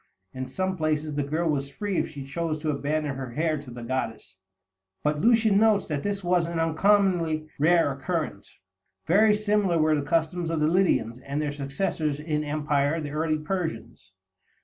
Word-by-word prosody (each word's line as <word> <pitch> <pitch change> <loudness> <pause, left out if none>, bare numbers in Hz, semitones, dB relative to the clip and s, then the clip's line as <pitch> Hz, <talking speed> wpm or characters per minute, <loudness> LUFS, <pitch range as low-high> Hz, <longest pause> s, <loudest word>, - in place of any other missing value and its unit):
In 130 0 -5
some 185 +7 -2
places 155 -1 -1
the 145 - 0
girl 155 +4 -1
was 140 -3 -1
free 195 +6 -3
if - - 0
she 140 -3 -8
chose 160 +2 -2
to 155 - +1
abandon 145 0 -2
her 130 -3 -6
hair 155 +1 0
to 140 -2 -11
the 120 0 -8
goddess, 115 -6 -4 0.7
but 150 0 0
Lucian 225 -2 +4
notes 215 -2 +3
that 145 -2 -1
this 200 +1 -3
was 175 -1 +2
an 170 -1 -3
uncommonly 165 -2 +2
rare 165 0 +4
occurrence. 140 - -4 0.5
Very 210 +5 +5
similar 205 -4 +1
were 155 0 +3
the 145 - 0
customs 165 +3 0
of 165 -1 -1
the 150 - +3
Lydians 160 - +2
and 140 +2 -4
their 150 -1 -1
successors 145 +1 -2
in 150 0 -2
empire, 145 0 0
the 150 -2 -5
early 155 +1 0
Persians. 155 - -5
155 Hz, 175 wpm, -26 LUFS, 145-175 Hz, 0.7 s, Very